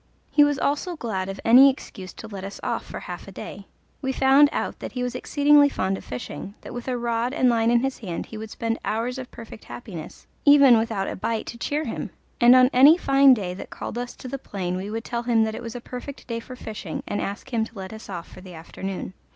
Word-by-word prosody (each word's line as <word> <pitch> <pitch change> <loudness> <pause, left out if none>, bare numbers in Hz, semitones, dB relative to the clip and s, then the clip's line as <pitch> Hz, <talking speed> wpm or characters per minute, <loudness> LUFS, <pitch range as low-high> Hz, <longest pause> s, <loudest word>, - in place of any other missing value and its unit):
He 295 - +6
was 290 -1 +2
also 295 +7 -1
glad 195 - -3
of 195 - -6
any 255 +4 +9
excuse 190 -8 -7
to 225 - -9
let 200 -3 -7
us 200 +1 -7
off - - -2
for - - -8
half - - -8
a - - -9
day. - - -9 0.3
We 265 -2 -1
found 270 +2 +5
out - - -3
that - - -7
he 250 -1 -2
was 250 - -2
exceedingly 290 0 +4
fond 190 -7 -1
of - - -8
fishing 145 +10 -7
that - - -9
with 245 +1 -6
a 255 -1 -1
rod 235 +2 -1
and 255 -5 +4
line 230 -1 +2
in 240 0 +4
his 270 0 -2
hand 180 -7 -5
he - - -11
would 220 0 -7
spend 230 +1 -2
hours 240 +4 -2
of 255 - -7
perfect 225 -1 -11
happiness, 180 -10 -9 0.2
even 280 -4 +8
without 220 -4 -1
a - - -3
bite 225 +3 -2
to 235 - -7
cheer 295 +5 -1
him, - - -4 0.3
and 240 +1 +8
on 255 +1 +6
any 280 +6 +8
fine 275 -4 +6
day 185 -5 -4
that 185 - -8
called - - -6
us 245 0 -5
to - - -9
the 275 +2 -5
plain 185 -7 -4
we 190 +2 -4
would 225 +1 -4
tell 235 -1 -2
him 235 -2 +3
that 220 0 -1
it - - -6
was 230 0 -7
a - - -4
perfect 255 +3 -8
day 230 -1 -3
for 255 +2 -10
fishing, 215 -8 -6
and 205 - -2
ask 205 +6 -5
him 225 -1 +2
to 225 0 -9
let 190 +1 -7
us 220 -1 -10
off 175 -3 -6
for 185 - -13
the 185 -2 -11
afternoon. 185 +3 -6
235 Hz, 250 wpm, -24 LUFS, 200-265 Hz, 0.3 s, any